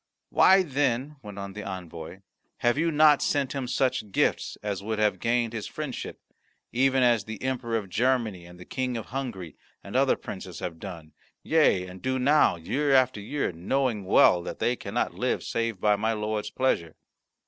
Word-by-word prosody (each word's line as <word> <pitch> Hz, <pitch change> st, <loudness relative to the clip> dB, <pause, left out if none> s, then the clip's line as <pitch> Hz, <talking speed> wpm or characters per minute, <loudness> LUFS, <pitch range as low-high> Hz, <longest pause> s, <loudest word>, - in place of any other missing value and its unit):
"Why, 190 Hz, 0 st, +6 dB
then," 140 Hz, -1 st, -1 dB
went 105 Hz, -3 st, -10 dB
on 100 Hz, -1 st, -6 dB
the 105 Hz, -, -6 dB
envoy, 90 Hz, -1 st, -7 dB, 0.4 s
"have 120 Hz, 0 st, +2 dB
you 165 Hz, +3 st, +1 dB
not 150 Hz, -1 st, +5 dB
sent 140 Hz, -2 st, 0 dB
him 135 Hz, -3 st, -3 dB
such 125 Hz, -5 st, 0 dB
gifts -, -, 0 dB
as 100 Hz, -2 st, -3 dB
would 110 Hz, +2 st, -3 dB
have 105 Hz, -1 st, +1 dB
gained 115 Hz, -1 st, 0 dB
his 110 Hz, -2 st, -4 dB
friendship, 150 Hz, -5 st, -6 dB, 0.5 s
even 130 Hz, +1 st, +3 dB
as 120 Hz, -4 st, +3 dB
the 110 Hz, -2 st, -7 dB
Emperor 125 Hz, -3 st, -1 dB
of 105 Hz, -3 st, -5 dB
Germany 110 Hz, -4 st, 0 dB
and 90 Hz, 0 st, -14 dB
the 90 Hz, -, -11 dB
King 130 Hz, -2 st, -2 dB
of 115 Hz, -, -5 dB
Hungary 115 Hz, -, -5 dB, 0.3 s
and -, -, -9 dB
other -, -, +4 dB
princes -, -, -8 dB
have 80 Hz, -2 st, -5 dB
done, 85 Hz, -6 st, -9 dB, 0.3 s
yea, 150 Hz, -, +3 dB
and 90 Hz, 0 st, -11 dB
do 130 Hz, 0 st, -1 dB
now 140 Hz, +4 st, +4 dB
year 135 Hz, -, -1 dB
after 130 Hz, -5 st, +3 dB
year, 140 Hz, +5 st, -2 dB
knowing 105 Hz, +6 st, -1 dB
well 90 Hz, -2 st, +5 dB
that -, -, -6 dB
they 120 Hz, -, +1 dB
cannot -, -, -2 dB
live -, -, -1 dB
save 115 Hz, -4 st, -2 dB
by 105 Hz, +1 st, +3 dB
my 110 Hz, +2 st, 0 dB
lord's 105 Hz, -1 st, -2 dB
pleasure?" 95 Hz, -11 st, -1 dB
115 Hz, 180 wpm, -27 LUFS, 100-130 Hz, 0.5 s, Why